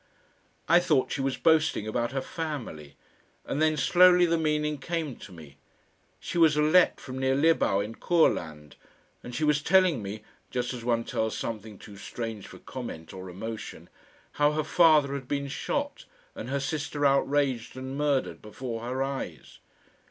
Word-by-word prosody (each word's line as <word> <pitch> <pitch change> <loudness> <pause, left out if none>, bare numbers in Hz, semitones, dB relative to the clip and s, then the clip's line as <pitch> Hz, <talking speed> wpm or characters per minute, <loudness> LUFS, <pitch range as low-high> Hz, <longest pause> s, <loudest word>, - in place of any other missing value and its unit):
I 170 +2 +6
thought 155 -7 +1
she 135 - -2
was 135 -1 -1
boasting 160 -9 +2
about 120 +2 -1
her 135 0 -2
family, 120 - -6 0.5
and 145 - -2
then 155 -1 +3
slowly 180 +4 +6
the 170 -1 +2
meaning 150 -2 0
came 160 -2 -3
to 100 - -12
me. 75 -6 -13 0.6
She 175 - -3
was 155 -3 +5
a - - +4
Lett 175 +4 +4
from 130 -1 -7
near 130 0 +1
Libau 140 -9 +3
in 105 +2 -5
Courland, 80 - 0 0.4
and 120 - -8
she 140 - -2
was 150 -1 +2
telling 180 - +3
me 105 +2 -6 0.3
just 125 0 -2
as 120 -2 -7
one 115 -1 +1
tells 110 -1 -2
something 110 -2 -5
too 100 0 -13
strange 110 0 -6
for - - -12
comment 80 0 -8
or 95 0 -8
emotion 110 +5 -7 0.4
how 145 0 +2
her 155 0 0
father 155 -3 +4
had 135 -2 -5
been 140 0 -2
shot 285 - -3 0.3
and - - -7
her 140 +1 -1
sister 145 +1 -2
outraged 135 -3 +1
and 130 +1 -6
murdered 145 -2 0
before 115 +2 -6
her 130 +3 -2
eyes. 135 - -6
135 Hz, 165 wpm, -27 LUFS, 115-155 Hz, 0.6 s, I